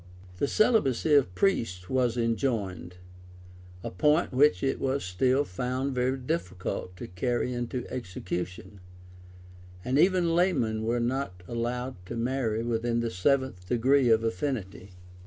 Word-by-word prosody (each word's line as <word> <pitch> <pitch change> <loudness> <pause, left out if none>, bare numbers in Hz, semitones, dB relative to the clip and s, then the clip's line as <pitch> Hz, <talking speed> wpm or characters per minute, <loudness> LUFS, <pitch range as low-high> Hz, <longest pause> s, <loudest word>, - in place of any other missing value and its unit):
The 140 - +1
celibacy 160 - +2
of 135 -11 +4
priests 105 - 0
was 125 -1 +1
enjoined; 115 -7 -1 0.9
a - - -4
point 150 - +2
which 130 -7 +4
it 135 - 0
was 135 -2 -1
still 125 +10 +2
found 130 +8 -2
very 130 +1 0
difficult 90 -5 -4
to - - -6
carry 120 +7 -1
into 120 0 -3
execution; 95 -3 -5 1.1
and 130 +3 +1
even 180 -1 +3
laymen 135 -12 +1
were 120 +2 +1
not 120 -7 -2
allowed 120 -2 -3
to 120 - -5
marry 115 -2 -1
within 115 0 0
the 115 -1 -2
seventh 110 -2 0
degree 125 +3 +3
of 110 0 +4
affinity. 105 -3 -3
120 Hz, 130 wpm, -28 LUFS, 95-135 Hz, 1.1 s, of